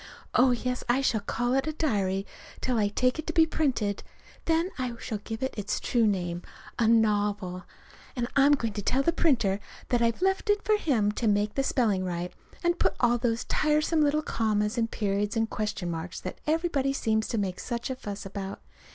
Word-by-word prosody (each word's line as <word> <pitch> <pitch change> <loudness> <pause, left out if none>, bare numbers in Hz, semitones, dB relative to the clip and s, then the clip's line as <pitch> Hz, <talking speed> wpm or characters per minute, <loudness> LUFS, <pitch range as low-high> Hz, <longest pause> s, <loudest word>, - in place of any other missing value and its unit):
Oh, 255 +1 +5
yes, 250 +1 -1
I 255 +3 +3
shall 235 -5 +2
call 245 +4 -1
it 270 +2 +1
a 310 - -1
diary 200 - 0 0.3
till 250 -3 0
I 205 - +3
take 255 +7 +1
it 315 - -5
to 325 - -2
be 325 0 +6
printed. 260 -11 0 0.4
Then 330 +3 +1
I 250 -2 -2
shall 215 - -4
give 225 +4 -6
it 265 - -1
its 205 -2 -2
true 235 -3 +2
name 175 -3 -1 0.4
a 230 - +3
novel. 205 -5 +2 0.5
And 240 -2 -1
I'm 275 +1 +6
going 230 -6 0
to 205 - -3
tell 265 +7 +1
the 335 - +2
printer 230 - +2 0.3
that 245 -1 +2
I've 230 +8 +1
left 385 +2 +1
it 415 0 +3
for 430 - +4
him 235 - +1
to 225 +2 -2
make 205 0 +2
the 275 - +1
spelling 225 -8 +1
right, 180 -1 -3 0.3
and 345 0 +1
put - - +2
in - - -23
all 240 -1 +3
those 230 0 0
tiresome 305 +1 +2
little 300 +1 +2
commas 210 -3 0
and 230 -2 0
periods 205 +1 -1
and 225 0 +2
question 210 -5 -3
marks 165 +2 -5
that 185 - -7
everybody 305 -4 +1
seems 220 -4 0
to 230 - -2
make 190 -3 -2
such 240 +1 -3
a - - -2
fuss 205 -6 -6
about. 195 0 -5
230 Hz, 205 wpm, -28 LUFS, 205-275 Hz, 0.5 s, be